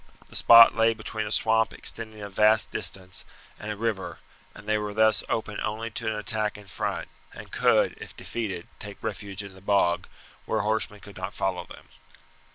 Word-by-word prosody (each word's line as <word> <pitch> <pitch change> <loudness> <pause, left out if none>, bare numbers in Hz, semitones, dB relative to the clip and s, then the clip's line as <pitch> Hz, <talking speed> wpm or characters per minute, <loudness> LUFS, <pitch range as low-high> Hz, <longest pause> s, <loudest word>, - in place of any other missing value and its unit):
The - - -11
spot 115 0 +9
lay 115 0 +3
between 110 0 -4
a - - -5
swamp 110 0 +3
extending 110 -2 -7
a 100 - -5
vast 110 +2 +4
distance, 95 -1 -3 0.4
and 105 - -5
a 105 - -5
river, 110 -3 -2 0.4
and 105 - -12
they 110 0 +2
were 105 -1 -4
thus 110 -2 +4
open 110 -3 -2
only 110 +2 -3
to 115 +1 -3
an 110 - 0
attack 105 -1 -1
in 105 - -13
front, 95 - -3 0.3
and - - -11
could, - - +3
if - - -10
defeated, 105 -7 -4
take 105 -1 -8
refuge 100 -1 -4
in 100 -1 -10
the 95 - -15
bog, 90 -3 +2 0.4
where - - +1
horsemen 105 -1 -1
could 100 -1 -13
not 95 +2 -5
follow 95 -2 -2
them. - - -13
105 Hz, 185 wpm, -26 LUFS, 100-110 Hz, 0.4 s, spot